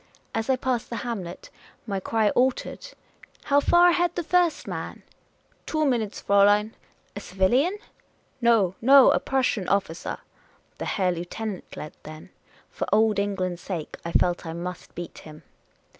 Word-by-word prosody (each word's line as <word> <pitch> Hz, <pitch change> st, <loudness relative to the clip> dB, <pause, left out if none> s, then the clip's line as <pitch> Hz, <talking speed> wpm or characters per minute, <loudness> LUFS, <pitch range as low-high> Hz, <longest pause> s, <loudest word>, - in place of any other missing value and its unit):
As 225 Hz, +1 st, -2 dB
I 265 Hz, -, +4 dB
passed 255 Hz, -2 st, -2 dB
the 235 Hz, -, -4 dB
hamlet 190 Hz, -8 st, -6 dB, 0.3 s
my 200 Hz, -4 st, -2 dB
cry 215 Hz, +2 st, +1 dB
altered. 255 Hz, +1 st, 0 dB, 0.2 s
* -, -, -36 dB
' -, -, -29 dB
How 285 Hz, 0 st, +3 dB
far 345 Hz, +4 st, +5 dB
ahead 350 Hz, 0 st, +1 dB
the 345 Hz, -, -2 dB
first 350 Hz, 0 st, +1 dB
man? -, -, -6 dB, 0.2 s
" -, -, -40 dB
" -, -, -38 dB
Two 310 Hz, -1 st, 0 dB
minutes, 230 Hz, -6 st, -1 dB
Fraulein." 205 Hz, +2 st, +4 dB, 0.4 s
"A -, -, -4 dB
civilian?" 240 Hz, -, +1 dB, 0.3 s
" 270 Hz, -, -40 dB
No, 225 Hz, -6 st, +3 dB
no; 270 Hz, +3 st, +7 dB
a -, -, +2 dB
Prussian 255 Hz, -7 st, 0 dB
officer." 195 Hz, -4 st, -1 dB, 0.6 s
The -, -, -3 dB
Herr 185 Hz, -3 st, 0 dB
Lieutenant 180 Hz, +4 st, -6 dB
led, 150 Hz, -, -7 dB
then. 155 Hz, 0 st, -11 dB, 0.4 s
For -, -, -4 dB
Old 215 Hz, -1 st, +3 dB
England's 185 Hz, -3 st, -2 dB
sake, 170 Hz, -6 st, -5 dB
I 170 Hz, -, -4 dB
felt 175 Hz, 0 st, +1 dB
I 165 Hz, -2 st, -6 dB
must 175 Hz, +1 st, -7 dB
beat 175 Hz, -1 st, -7 dB
him. 155 Hz, -1 st, -13 dB
210 Hz, 165 wpm, -25 LUFS, 180-260 Hz, 0.6 s, no